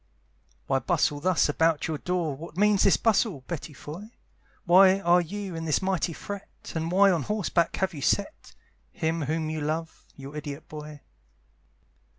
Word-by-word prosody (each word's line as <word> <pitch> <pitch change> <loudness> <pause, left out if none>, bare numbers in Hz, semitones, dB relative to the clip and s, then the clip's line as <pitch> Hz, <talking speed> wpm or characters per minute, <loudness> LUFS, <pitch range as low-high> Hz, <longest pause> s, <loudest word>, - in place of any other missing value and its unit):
Why 135 -1 +1
bustle 150 +1 +1
thus 180 +2 +2
about 160 +1 +1
your 155 -2 -3
door, 175 -5 -1
What 165 +3 -10
means 205 0 +4
this 195 - +5
bustle, 215 - +1
Betty 165 -2 -6
Foy? 160 +9 -9 0.6
Why 190 +2 +6
are 175 -1 +4
you 195 +2 -5
in 165 0 -5
this 155 - +2
mighty 190 -2 0
fret? 200 +4 -7 0.2
And 160 +1 -2
why 195 +2 +5
on 170 -4 +1
horseback 185 -3 0
have 190 -1 -1
you 145 - -7
set 200 - -1 0.4
Him 165 -4 -2
whom 155 +2 -2
you 155 -1 -3
love, 160 +2 -4
your 140 +2 -10
idiot 150 0 -6
boy? 150 -1 -9
165 Hz, 160 wpm, -27 LUFS, 150-190 Hz, 0.6 s, Why